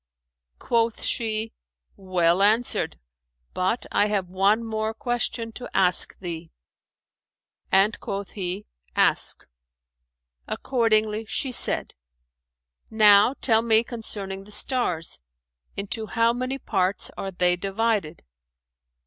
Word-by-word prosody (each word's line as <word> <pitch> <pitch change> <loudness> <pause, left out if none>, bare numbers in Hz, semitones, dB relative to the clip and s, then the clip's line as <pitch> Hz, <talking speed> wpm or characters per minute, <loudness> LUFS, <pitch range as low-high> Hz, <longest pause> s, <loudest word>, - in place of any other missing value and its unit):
Quoth 230 -1 0
she, 220 -1 -1 0.4
"Well 185 -1 +1
answered; 215 - +1 0.6
but 185 +6 -1
I 205 - +3
have 195 -4 -1
one 200 +5 +2
more 220 0 -3
question 240 -2 -2
to 245 +2 -9
ask 180 -2 +1
thee;" 170 -3 -6 1.2
and 195 +3 +3
quoth 200 0 -5
he, 190 +1 -4 0.3
"Ask!" - - +2 1.0
Accordingly 220 -3 +1
she 260 +4 -2
said, - - +3 1.0
"Now 215 +3 +6
tell 225 -3 +4
me 225 -1 +4
concerning 200 -5 -6
the 210 - -13
stars, 180 - 0 0.6
into 215 +2 -2
how 230 +1 +2
many 255 +2 -3
parts 195 -6 -1
are 195 - -5
they 180 -1 +2
divided." 195 -2 -2
215 Hz, 105 wpm, -24 LUFS, 190-230 Hz, 1.2 s, Now